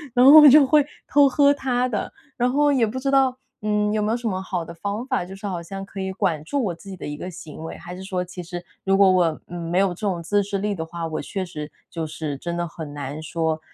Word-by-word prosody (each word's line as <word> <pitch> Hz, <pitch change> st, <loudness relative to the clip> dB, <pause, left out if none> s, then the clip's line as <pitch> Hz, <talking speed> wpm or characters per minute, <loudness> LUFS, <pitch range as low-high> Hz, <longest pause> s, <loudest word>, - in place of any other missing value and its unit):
然 250 Hz, +1 st, +6 dB
后 290 Hz, +3 st, +11 dB
我 300 Hz, -, +10 dB
就 285 Hz, +1 st, +8 dB
会 295 Hz, +1 st, +4 dB, 0.2 s
偷 285 Hz, -1 st, +5 dB
喝 285 Hz, +1 st, +4 dB
他 255 Hz, -3 st, 0 dB
的。 220 Hz, -5 st, -3 dB, 0.2 s
然 245 Hz, 0 st, +1 dB
后 290 Hz, +2 st, +3 dB
也 245 Hz, -5 st, +3 dB
不 235 Hz, -, -5 dB
知 275 Hz, +1 st, -1 dB
道， 265 Hz, -2 st, +3 dB, 0.2 s
嗯， 210 Hz, 0 st, +1 dB
有 215 Hz, -, +1 dB
没 210 Hz, +1 st, 0 dB
有 235 Hz, -, +1 dB
什 235 Hz, -, -4 dB
么 190 Hz, -3 st, -2 dB
好 185 Hz, -2 st, -3 dB
的 170 Hz, -, -9 dB
方 205 Hz, +7 st, -4 dB
法， 185 Hz, -, -1 dB
就 190 Hz, +2 st, -9 dB
是 195 Hz, -, -9 dB
好 180 Hz, -3 st, -3 dB
像 195 Hz, +3 st, -7 dB
可 195 Hz, 0 st, -9 dB
以 190 Hz, 0 st, -2 dB
管 175 Hz, -6 st, -1 dB
住 280 Hz, -, -1 dB
我 180 Hz, -, -1 dB
自 195 Hz, +4 st, -13 dB
己 190 Hz, -, -6 dB
的 -, -, -7 dB
一 145 Hz, -, -4 dB
个 180 Hz, -, -6 dB
行 165 Hz, -3 st, -10 dB
为， 160 Hz, -, -7 dB
还 175 Hz, +1 st, -9 dB
是 185 Hz, -, -8 dB
说 185 Hz, -2 st, -2 dB
其 180 Hz, 0 st, -8 dB
实 175 Hz, 0 st, -7 dB, 0.2 s
如 195 Hz, 0 st, +2 dB
果 195 Hz, -1 st, +6 dB
我 170 Hz, -4 st, +2 dB
没 175 Hz, 0 st, -3 dB
有 195 Hz, 0 st, +3 dB
这 175 Hz, -, -6 dB
种 190 Hz, -5 st, -1 dB
自 205 Hz, +4 st, +2 dB
制 200 Hz, 0 st, -3 dB
力 205 Hz, +1 st, -1 dB
的 160 Hz, -, -4 dB
话， 165 Hz, 0 st, -5 dB
我 160 Hz, -, -3 dB
确 190 Hz, -2 st, -4 dB
实 150 Hz, -4 st, -7 dB, 0.2 s
就 165 Hz, -2 st, -3 dB
是 155 Hz, -2 st, -5 dB
真 170 Hz, +3 st, -4 dB
的 175 Hz, 0 st, -1 dB
很 155 Hz, -3 st, -8 dB
难 145 Hz, +1 st, -5 dB
说， 160 Hz, 0 st, -1 dB
190 Hz, 295 characters per minute, -23 LUFS, 170-230 Hz, 0.2 s, 后